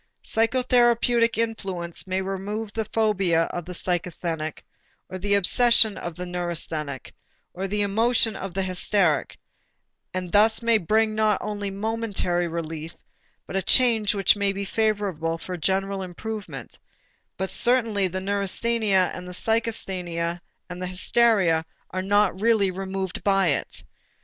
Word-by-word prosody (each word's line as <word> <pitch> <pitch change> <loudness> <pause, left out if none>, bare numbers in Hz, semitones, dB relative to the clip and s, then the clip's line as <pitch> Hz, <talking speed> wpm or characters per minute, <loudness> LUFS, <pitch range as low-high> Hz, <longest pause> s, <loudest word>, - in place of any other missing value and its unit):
Psychotherapeutic 235 0 +2
influence 195 -7 -3
may 185 +1 -1
remove 200 +3 -4
the 220 -1 -2
phobia 195 -7 +2
of 175 0 -6
a - - -5
psychasthenic 170 -3 -3 0.5
or 185 - -6
the 200 +2 +1
obsession 220 +2 +4
of 175 -1 -6
a 180 - -3
neurasthenic 165 -6 -4 0.4
or 190 +2 -3
the 205 +1 0
emotion 225 +2 +3
of 190 -1 -6
a 195 - +1
hysteric, 185 -4 0 0.7
and 180 -1 -4
thus 220 +3 +4
may 230 -1 +4
bring 215 +4 +2
not 215 -2 +2
only 205 -1 -4
momentary 200 -4 -1
relief 165 -1 -5 0.5
but - - -7
a 195 - +1
change 225 -1 +4
which 195 0 +4
may 200 -1 +1
be 200 0 -4
favorable 195 -7 -1
for 180 +2 -6
general 195 +3 -1
improvement, 210 +4 -7 0.6
but 190 0 -2
certainly 230 -6 +2
the 185 +1 -4
neurasthenia 200 0 +1
and 180 0 -7
psychasthenia 180 -5 -2 0.3
and 180 0 -7
hysteria 185 -2 +2 0.3
are 185 - -2
not 205 0 +2
really 215 -4 +3
removed 190 0 -4
by 195 -3 +3
it. 145 - -2
195 Hz, 130 wpm, -24 LUFS, 180-220 Hz, 0.7 s, obsession